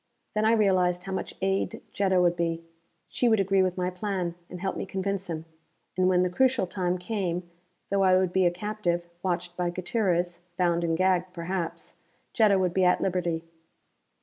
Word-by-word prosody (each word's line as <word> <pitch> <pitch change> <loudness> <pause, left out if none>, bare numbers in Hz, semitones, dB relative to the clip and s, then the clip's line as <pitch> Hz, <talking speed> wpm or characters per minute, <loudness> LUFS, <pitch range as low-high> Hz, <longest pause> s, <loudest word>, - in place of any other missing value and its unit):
Then 215 0 +1
I 225 - +5
realized 185 -5 +2
how 195 - -6
much 190 - -4
aid 195 0 0
Jetta 190 -2 +2
would 175 -1 +3
be. 165 -1 -1 0.4
She 245 - +1
would 220 -2 +4
agree 195 0 +3
with 185 0 0
my 180 0 0
plan, 180 -2 -2 0.2
and 180 - -7
help 190 +1 -2
me - - -3
convince 195 0 -3
him. 160 -1 -4 0.5
And 185 0 +3
when 180 -1 +4
the 180 - +1
crucial 260 +1 +2
time 180 0 -1
came, 180 -2 -3 0.4
though 200 0 +2
I 185 -1 +5
would 185 -1 +1
be 190 -1 +4
a - - +5
captive, 175 -2 -2
watched 175 -1 -2
by 180 -1 0
Gutierrez, 175 -2 -1 0.2
bound 175 -1 +2
and 165 -1 +1
gagged, 185 0 +1
perhaps 170 -1 -4 0.4
Jetta 210 -4 +4
would 180 -2 +1
be 190 - +2
at 180 0 +4
liberty. 175 -3 -1
185 Hz, 185 wpm, -27 LUFS, 175-195 Hz, 0.5 s, I